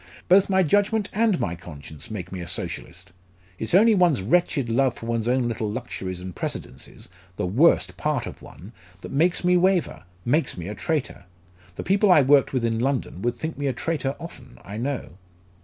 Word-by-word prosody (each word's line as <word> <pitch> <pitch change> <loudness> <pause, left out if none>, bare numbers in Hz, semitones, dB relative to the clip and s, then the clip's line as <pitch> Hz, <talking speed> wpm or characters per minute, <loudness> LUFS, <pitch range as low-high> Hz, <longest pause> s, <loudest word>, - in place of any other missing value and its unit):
"Both 190 +2 +5
my 190 -1 +4
judgment 205 +5 +2
and 220 -4 +2
my 85 - -1
conscience 80 -4 -10
make 105 -5 -6
me 95 -2 -5
a 85 - -7
Socialist. - - -5 0.5
It's 110 +9 0
only 220 +4 +6
one's 175 - +3
wretched 145 - +1
love 125 +2 +2
for - - -9
one's 115 -1 -1
own 125 0 +2
little 110 -2 -2
luxuries 95 -6 -5
and 90 -2 -7
precedences 65 - -6 0.3
the - - -2
worst 125 - +3
part 150 -5 -1
of - - -9
one 95 +6 -12 0.3
that - - -8
makes 170 +7 +2
me 180 0 +4
waver, 180 - +1 0.2
makes 150 - +1
me 90 0 -6
a 105 - -4
traitor! 150 +8 -3 0.5
The - - -5
people 200 +1 +3
I 150 -5 +7
worked 140 0 +4
with 125 -3 0
in 115 -1 0
London 125 -7 -1
would 120 +2 0
think 160 +4 -5
me 145 - -1
a 135 - 0
traitor 140 0 -2
often, 165 -7 -11
I 100 +2 -7
know." 125 -6 -4
130 Hz, 190 wpm, -24 LUFS, 110-170 Hz, 0.5 s, I